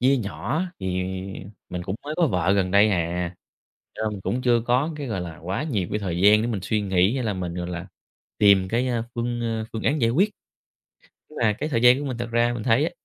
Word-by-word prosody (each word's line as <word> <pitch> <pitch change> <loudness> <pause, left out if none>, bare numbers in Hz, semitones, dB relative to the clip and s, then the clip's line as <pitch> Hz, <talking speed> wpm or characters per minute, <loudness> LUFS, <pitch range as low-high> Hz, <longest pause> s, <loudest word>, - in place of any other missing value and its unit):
chia 135 +2 +4
nhỏ 120 - -2 0.2
thì 95 - -4 0.8
mình 90 -1 -4
cũng 95 +2 -3
mới 150 +1 -4
có 170 -2 +4
vợ 90 - +1
gần 95 -2 +1
đây 100 +2 +5
à, 85 0 -1 0.6
cho - - -5
nên 110 - 0
mình 100 - -6
cũng 125 +5 -1
chưa 120 -2 +3
có 125 +7 +1
cái, 145 -2 -5
gọi 100 -6 -2
là, 85 -2 -7
quá 95 - -3
nhiều 105 - -1
cái 105 - 0
thời 90 -4 -3
gian 105 +3 +6
để 120 - -1
mình 110 -5 -2
suy 105 +2 0
nghĩ 95 +3 +2
hay 130 - -2
là 105 -3 -1
mình, 90 -2 -4
gọi 90 0 -4
là, 90 +1 -5 0.5
tìm 100 -3 +5
cái, 120 +4 0
a, 120 -2 0
phương, 120 0 -2
a, 115 -1 -2
phương 110 - -4
án 150 +1 +1
giải 115 - +4
quyết. 190 - +3 1.0
Nhưng - - -9
mà 105 -2 +4
cái 150 +9 -4
thời 115 -5 0
gian 125 +2 +7
của 145 - -4
mình 130 - -3
thật 120 -1 -4
ra 120 +1 +2
mình 115 - -4
thấy 125 +4 +3
á, 170 - -1
110 Hz, 255 wpm, -24 LUFS, 95-125 Hz, 1.0 s, gian